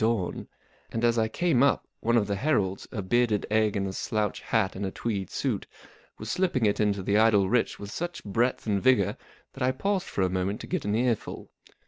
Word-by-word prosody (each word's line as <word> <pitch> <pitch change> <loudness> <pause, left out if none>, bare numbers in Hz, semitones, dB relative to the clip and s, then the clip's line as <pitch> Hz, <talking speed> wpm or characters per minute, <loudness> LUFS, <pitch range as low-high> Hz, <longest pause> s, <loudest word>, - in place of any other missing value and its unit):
Oami; 110 -5 0 0.4
and 115 +1 0
as 120 0 +3
I 110 - +2
came 165 0 +1
up 140 - +3
one 120 +1 +2
of 110 - +3
the 100 0 -1
Heralds, 100 -7 0
a 105 - -4
bearded 110 +1 +2
egg 110 -1 +2
in 100 - 0
a 95 - -4
slouch 105 0 -1
hat 110 -4 0
and 95 - -4
a 95 - -1
tweed 100 -1 -3
suit, - - -2 0.5
was 110 +1 -5
slipping 175 -11 +1
it 100 - +1
into 100 -2 +1
the 100 +3 +2
Idle 105 -3 +4
Rich 120 +3 +1
with 100 0 -8
such 175 +6 -4
breadth 115 +5 0
and 100 -3 0
vigour 125 -7 +3 0.4
that 135 - -11
I 130 0 +3
paused 195 +7 -1
for 95 - -1
a - - +3
moment 95 +2 -1
to - - -6
get - - -2
an 105 +1 0
earful. 120 -1 -1
110 Hz, 215 wpm, -27 LUFS, 100-120 Hz, 0.5 s, Idle